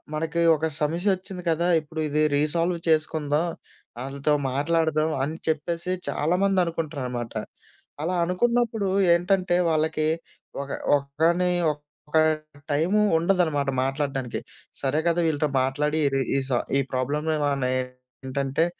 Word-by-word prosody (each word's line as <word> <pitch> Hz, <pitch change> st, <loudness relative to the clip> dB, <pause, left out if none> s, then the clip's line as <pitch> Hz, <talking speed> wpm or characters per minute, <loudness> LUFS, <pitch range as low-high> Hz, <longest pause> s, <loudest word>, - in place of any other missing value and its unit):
మనకి 165 Hz, +2 st, -1 dB
ఒక 155 Hz, -, -2 dB, 0.2 s
సమస్యొచ్చింది 180 Hz, +4 st, -1 dB
కదా, 170 Hz, +2 st, +1 dB
ఇప్పుడు 155 Hz, +1 st, -8 dB
ఇది 150 Hz, +1 st, +2 dB
రీసాల్వ్ 165 Hz, +4 st, +1 dB
చేసుకుందాం, 155 Hz, 0 st, +1 dB, 0.6 s
ఆళ్ళతో 140 Hz, +2 st, -1 dB, 0.2 s
మాట్లాడదాం 160 Hz, +2 st, +1 dB
అని 155 Hz, +4 st, -3 dB
చెప్పేసి 165 Hz, +3 st, -1 dB, 0.2 s
చాలామంది 185 Hz, +5 st, +1 dB
అనుకుంటారనమాట. 140 Hz, -8 st, -4 dB, 0.7 s
అలా 175 Hz, +3 st, -1 dB
అనుకున్నప్పుడు 225 Hz, +2 st, +1 dB, 0.3 s
ఏంటంటే, 180 Hz, +1 st, +2 dB, 0.2 s
వాళ్ళకి 155 Hz, 0 st, +1 dB, 0.6 s
ఒక 140 Hz, -, -11 dB, 0.3 s
ఒకని 160 Hz, +6 st, +1 dB, 0.2 s
ఒక 150 Hz, +1 st, -6 dB, 0.5 s
టైము 175 Hz, +9 st, +2 dB, 0.2 s
ఉండదనమాట 160 Hz, -5 st, +1 dB
మాట్లాడ్డానికి. 135 Hz, -2 st, -2 dB, 0.4 s
సరే 140 Hz, +2 st, +1 dB
గదా, 170 Hz, 0 st, +2 dB
వీళ్ళతో 150 Hz, -1 st, +1 dB
మాట్లాడి 150 Hz, +4 st, 0 dB, 0.4 s
ఈ -, -, +3 dB
సా 125 Hz, -, +2 dB, 0.2 s
ఈ -, -, +3 dB
ప్రాబ్లమ్ 145 Hz, +5 st, -1 dB, 0.2 s
మనం 140 Hz, -2 st, 0 dB
ఏంటంటే, 130 Hz, +3 st, -3 dB
155 Hz, 110 wpm, -25 LUFS, 140-170 Hz, 0.7 s, ఈ